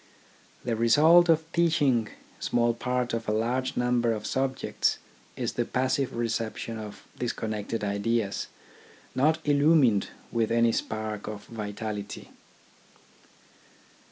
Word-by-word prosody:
The 120 -2 -1
result 155 +10 +6
of 160 -1 +4
teaching 145 -10 +2 0.3
small 120 -1 +1
parts 125 0 -2
of 115 -1 -2
a - - +2
large 125 +4 -1
number 120 -1 +2
of 105 -1 -5
subjects 130 0 0 0.4
is - - -2
the - - 0
passive 130 +1 -1
reception 115 -1 -3
of 105 -1 -9
disconnected 110 -2 -3
ideas, 100 +1 -1 0.7
not 155 +4 +3
illumined 145 -7 +4 0.2
with 115 -2 +1
any 115 0 +4
spark 110 -2 -3
of 105 -1 -6
vitality. 105 -1 -6
115 Hz, 110 wpm, -27 LUFS, 110-130 Hz, 0.7 s, result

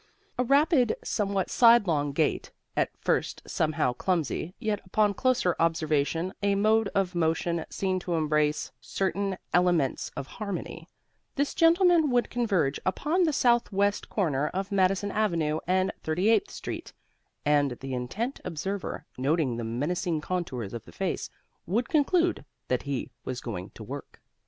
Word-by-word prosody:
With 250 -1 -1
a - - -13
rapid, 280 -4 +4
somewhat 200 -3 -1
sidelong 200 - +5
gait 150 +1 0 0.3
(at - - +2
first - - -1
somehow 155 -5 0
clumsy, 170 +3 -1
yet 215 -4 -2
upon 205 +2 +2
closer 235 -6 +1
observation 165 +2 +1
a 200 -1 +2
mode 215 +2 +3
of 195 -2 +1
motion 165 0 0
seen 190 -1 -1
to 175 -1 -2
embrace 150 -1 +1
certain 195 +6 -1 0.2
elements 175 -6 +2
of - - -3
harmony) 200 +5 -6 0.5
this 285 0 0
gentleman 335 -1 +5
would 245 -1 +1
converge 195 - +1
upon 305 - +1
the 315 - +2
southwest 225 -6 +2
corner 150 -8 0
of 195 +2 -4
Madison 195 +1 +2
avenue 170 -8 0
and 185 +1 +2
38th 210 - +2
street; - - -6 0.5
and 145 -3 +3
the 135 -1 -5
intent 200 - -3
observer, 190 +4 -4
noting 135 -2 +1
the 120 - -3
menacing 155 - -1
contours 150 - -3
of 115 -2 -6
the - - -13
face, 190 -2 -3 0.4
would 230 +7 0
conclude 340 +3 +2 0.3
that 125 - +1
he 135 -3 -3
was 130 -1 -4
going 100 -6 -6
to 110 - -9
work. 135 +6 -8
185 Hz, 140 wpm, -28 LUFS, 150-215 Hz, 0.5 s, sidelong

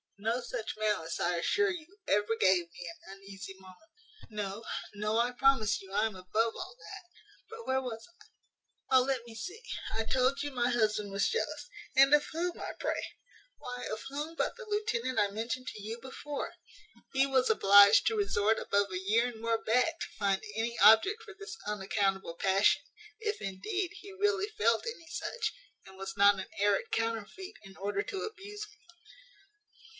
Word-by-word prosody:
No 225 +4 0
such 220 -3 -5
malice, 210 -7 -1
I 175 0 +1
assure 410 - +2
you, 355 +3 -9
ever 210 +2 +2
gave 180 -3 +3
me 175 0 -8 0.2
an 195 - -8
uneasy 195 0 -9
moment. 190 - -17 0.4
No, 210 0 -4 0.3
no, 210 +2 -1
I 240 +1 +2
promise 245 -5 +3
you 190 -1 -13
I 210 +2 +2
am 220 -3 -3
above 215 +5 0
all - - -7
that. - - -10 0.5
But 455 +1 -9
where 265 0 +2
was 230 -3 -6 0.8
I? 260 - +7
O - - +7
let 255 -2 -1
me 235 - -11
see, 370 - -7 0.3
I 225 - 0
told 260 +4 +2
you 290 - -3
my 245 -2 +1
husband 215 -4 +1
was 195 0 +1
jealous 460 - -2 0.3
And 275 +1 +7
of 295 0 +6
whom, 345 +2 -2
I - - -5
pray? - - -1 0.5
Why, 250 0 -6
of 215 - -4
whom 300 +4 -4
but - - -1
the 480 - -8
lieutenant 415 - 0
I 205 - +3
mentioned 230 +4 -3
to 210 - -9
you 220 +3 -5
before! 275 +3 -6 0.6
He 270 0 +4
was 265 -2 +2
obliged 200 -1 +7
to 445 - +2
resort 220 - +2
above 200 -1 +1
a 185 - -2
year 220 +6 +2
and 235 -3 -7
more 230 0 0
back 250 +9 +2
to - - -2
find 195 -1 +1
any 230 +1 -1
object 220 - +7
for 425 -2 -11
this 415 +2 -7
unaccountable 195 -3 -1
passion, 195 +3 +3 0.4
if, 430 -2 -2
indeed, 350 - -2
he 400 - -10
really 405 +1 +1
felt 230 - +2
any 455 -8 -6
such, 465 +7 -3 0.3
and 190 0 -14
was 195 0 -6
not 200 0 +6
an 190 - -5
arrant 205 -1 +2
counterfeit 230 - -3
in 195 -1 -13
order 200 +1 -1
to 395 - -5
abuse 415 0 -7
me. 425 - -20
230 Hz, 180 wpm, -31 LUFS, 200-310 Hz, 0.8 s, I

